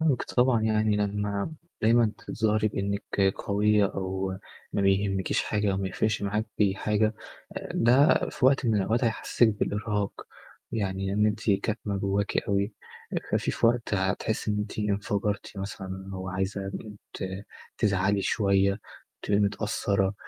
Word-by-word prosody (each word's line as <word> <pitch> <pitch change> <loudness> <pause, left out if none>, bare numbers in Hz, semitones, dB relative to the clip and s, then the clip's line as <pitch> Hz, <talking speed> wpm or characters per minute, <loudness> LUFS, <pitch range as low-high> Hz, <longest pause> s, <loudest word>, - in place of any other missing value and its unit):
فاهمِك 155 -6 +2
طبعًا. 125 -2 +2
يعني 110 -1 +2
لمّا 105 +3 -1 0.3
دايمًا 115 0 +4
تظهري 110 -1 0
بإنِّك 100 -1 0
قوية 105 +1 +2
أو 95 0 -3 0.3
ما 100 - 0
بيهمكيش 95 -1 +1
حاجة 105 -1 0
أو - - -1
ما 95 0 -1
يفرقش 110 +3 0
معاكِ 105 +2 -1 0.3
حاجة، 105 +2 +1 0.6
ده 130 +5 +5
في - - -3
وقت 135 -1 +3
من 110 - +3
الأوقات 110 +5 +1
هيحسسِك 115 +1 +2
بالإرهاق، 105 -1 -2 0.5
يعني 95 -2 -1
إن 105 +1 +3
أنتِ 105 +1 0
كاتمة 100 +1 -1
جواكِ 100 +1 0
أوي 100 +1 0 0.6
ففيه - - +1
في - - +2
وقت 115 -2 +1
هتحسي 105 +3 -1
إن 105 - 0
أنتِ 105 +1 -4
انفجرتِ 105 0 -1
مثلًا 95 -1 -6
وعايزة 95 +1 -3 0.4
ت - - -4 0.5
تزعلي 100 0 +2
شوية، 100 0 +2 0.4
تبقي 100 0 +2
متأثرة، 100 -1 0
105 Hz, 130 wpm, -27 LUFS, 100-110 Hz, 0.6 s, ده